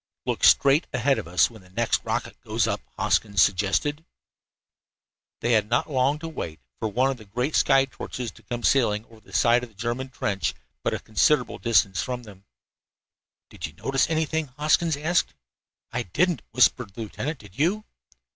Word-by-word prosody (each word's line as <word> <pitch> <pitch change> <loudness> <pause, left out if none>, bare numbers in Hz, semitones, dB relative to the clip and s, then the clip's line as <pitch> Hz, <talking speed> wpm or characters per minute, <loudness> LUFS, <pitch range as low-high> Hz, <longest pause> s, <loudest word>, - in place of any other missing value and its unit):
"Look - - -2
straight 140 +4 +5
ahead 130 +2 +2
of - - -7
us 90 +6 +3
when 110 -3 -14
the 90 - -19
next 115 +5 0
rocket - - -3
goes - - 0
up," - - -1 0.2
Hoskins 100 -3 +1
suggested. 105 - 0 1.4
They 120 - +1
had 110 -2 +3
not 120 +6 +1
long 135 +2 +2
to 165 +2 -7
wait 80 - -6 0.2
for 110 - -1
one 130 +6 +1
of 135 - -5
the 110 - -14
great 125 +9 -2
sky 135 -1 +4
torches 125 -2 -6
to 115 - -18
come 120 0 -5
sailing 110 -5 +2
over 115 -2 -18
the 100 - -20
side 120 +5 +4
of 125 - -7
the 110 - -26
German 120 +5 -3
trench, 100 - -2 0.3
but - - 0
from - - 0
a - - -14
considerable 150 +7 +2
distance 100 -6 +2
ahead 125 -1 -3
of - - -16
them. 100 -2 -14 1.1
"Did - - -5
you 75 - -14
notice 135 - 0
anything?" 160 -1 0
Hoskins 155 +1 +2
asked. 160 +4 0 0.6
"I - - -1
didn't," 170 - 0
whispered 125 -5 +2
the 115 - -6
lieutenant. 140 +8 -4
"Did 105 0 -15
you?" 200 +8 +1
120 Hz, 185 wpm, -25 LUFS, 105-145 Hz, 1.4 s, straight